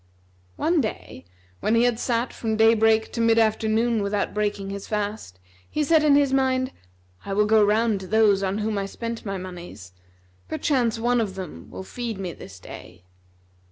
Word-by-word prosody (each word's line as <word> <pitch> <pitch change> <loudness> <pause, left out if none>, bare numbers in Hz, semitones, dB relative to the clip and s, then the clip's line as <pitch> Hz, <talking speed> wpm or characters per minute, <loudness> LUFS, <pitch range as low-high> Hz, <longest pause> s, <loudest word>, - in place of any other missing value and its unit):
One 335 -1 +2
day, 210 - -6 0.3
when 220 - +1
he 230 - +4
had 240 -2 +1
sat 240 0 -1
from 220 -2 -2
day 225 +1 +6
break 220 0 +2
to 230 - -2
mid 230 0 +4
afternoon 220 +1 +2
without 200 0 -1
breaking 205 -2 -2
his 200 0 -6
fast, 205 - -4 0.3
he 305 - -1
said 310 +1 +4
in 295 -2 +5
his 280 -2 +3
mind, 260 -1 +1 0.5
"I 195 - -4
will 210 +1 +3
go 215 0 +5
round 215 0 +2
to 190 - -9
those 210 -1 +3
on 195 +1 -1
whom 215 -1 -1
I 195 - -3
spent 230 +1 -6
my 195 0 -2
monies: 175 - -9 0.5
perchance 240 - 0
one 240 +1 +1
of 200 -4 -3
them 180 - -8
will - - -8
feed 230 +1 -5
me 185 -3 -5
this 95 -1 -12
day." 90 0 -12
220 Hz, 185 wpm, -24 LUFS, 195-235 Hz, 0.5 s, day